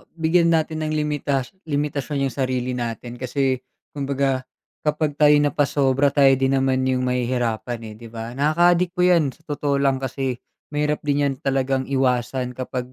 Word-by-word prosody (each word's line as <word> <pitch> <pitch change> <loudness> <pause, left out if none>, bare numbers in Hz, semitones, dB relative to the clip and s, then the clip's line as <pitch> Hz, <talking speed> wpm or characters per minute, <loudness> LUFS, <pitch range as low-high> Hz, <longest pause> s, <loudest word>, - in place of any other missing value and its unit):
bigyan 165 +1 +2
natin 155 -1 0
ng 155 - -2
limitash 150 -1 -1
limitasyon 145 -2 -1
'yung - - -9
sarili 130 -2 -1
natin 120 0 -5
kasi, 130 0 -1 0.4
kumbaga, 135 -2 0 0.4
kapag 150 -1 0
tayo 150 -1 +6
napasobra, 140 -1 +2
tayo 140 -2 +5
din 135 0 +1
naman 130 -1 +2
'yung 130 -1 +1
mahihirapan, 125 -2 -1
eh, - - -11
'di 115 0 -11
ba? 115 +2 -6
Nakaka-adik 175 +4 +3
po 180 - -4
yan, 170 -7 +4
sa - - -23
totoo 145 -1 0
lang, 135 -1 +2
kasi 130 -1 -3 0.3
mahirap 150 0 -1
din 145 -1 +1
'yan 140 -1 0
talagang 135 -1 0
iwasan 125 -1 0
kapag 125 0 -5
135 Hz, 160 wpm, -22 LUFS, 130-150 Hz, 0.4 s, tayo